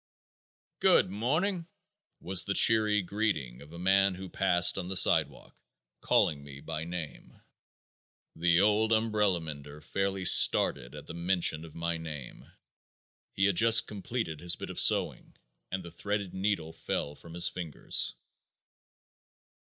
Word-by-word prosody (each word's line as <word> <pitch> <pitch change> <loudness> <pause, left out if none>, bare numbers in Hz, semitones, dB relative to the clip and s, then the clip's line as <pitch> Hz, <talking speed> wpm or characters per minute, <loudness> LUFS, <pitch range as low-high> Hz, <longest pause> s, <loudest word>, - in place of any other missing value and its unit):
"Good - - +3
morning!" 160 - -2 0.5
was 90 0 +2
the 100 - -2
cheery 110 -2 +4
greeting 85 - -3
of 75 +2 -14
a 85 - -11
man 95 +1 +2
who 95 0 -9
passed 90 -2 +3
on 90 - -6
the 95 - -4
sidewalk, - - +2 0.5
calling 70 -2 +1
me 70 -1 -11
by 75 +3 -5
name. 85 -3 -8 1.0
The 85 +1 +2
old 105 +2 +2
umbrella 105 -4 +1
mender 75 -2 -9
fairly 95 +4 -3
started 65 -6 +4
at 75 - -10
the - - -9
mention 85 -2 0
of 80 -2 -13
my 85 0 -3
name. 75 -5 -9 0.8
He 95 - +1
had 100 -3 +1
just 115 +1 +5
completed 100 -5 -5
his 85 +1 0
bit - - -8
of - - -5
sewing - - +1 0.3
and 95 0 -5
the 85 - -11
threaded 100 +2 -4
needle 95 -5 -2
fell 75 -2 -4
from 85 +2 -14
his 85 0 +3
fingers. 85 -5 -3
90 Hz, 140 wpm, -29 LUFS, 80-100 Hz, 1.0 s, just